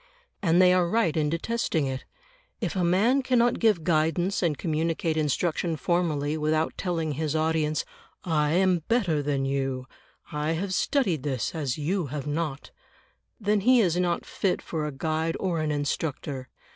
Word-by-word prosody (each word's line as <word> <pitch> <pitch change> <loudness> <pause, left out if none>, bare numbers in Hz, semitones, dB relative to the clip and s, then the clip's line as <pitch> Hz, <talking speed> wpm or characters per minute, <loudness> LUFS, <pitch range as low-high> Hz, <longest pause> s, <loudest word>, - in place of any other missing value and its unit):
And 170 -2 +3
they 180 0 +6
are 180 -2 +2
right 195 -7 +2
in 150 -2 +1
detesting 165 -2 -1
it; 130 -1 -4 0.5
if - - -2
a 185 - +1
man 210 +10 +3
cannot 245 -2 +2
give 210 -8 +3
guidance 170 +3 +1
and 165 -5 +1
communicate 165 0 -1
instruction 160 +2 0
formally 155 -3 0
without 155 +1 0
telling 165 -4 -2
his 155 +1 -2
audience 155 -1 +1 0.4
"I 150 -3 +1
am 185 0 +3
better 190 -11 +2
than 140 -1 -1
you; 135 -1 -1 0.5
I 150 +2 -1
have 185 +3 -2
studied 195 - +1
this 130 -4 -2
as 145 -6 -2
you 165 +3 -1
have 145 0 -5
not," 150 -1 -3 0.7
then 210 -1 +2
he 250 +5 +5
is 180 -7 +3
not 175 -1 0
fit 190 -3 -1
for 155 -2 -3
a - - -3
guide 160 +3 -1
or 175 -4 -1
an 155 -1 -1
instructor. 145 -2 -3
160 Hz, 160 wpm, -26 LUFS, 150-180 Hz, 0.7 s, they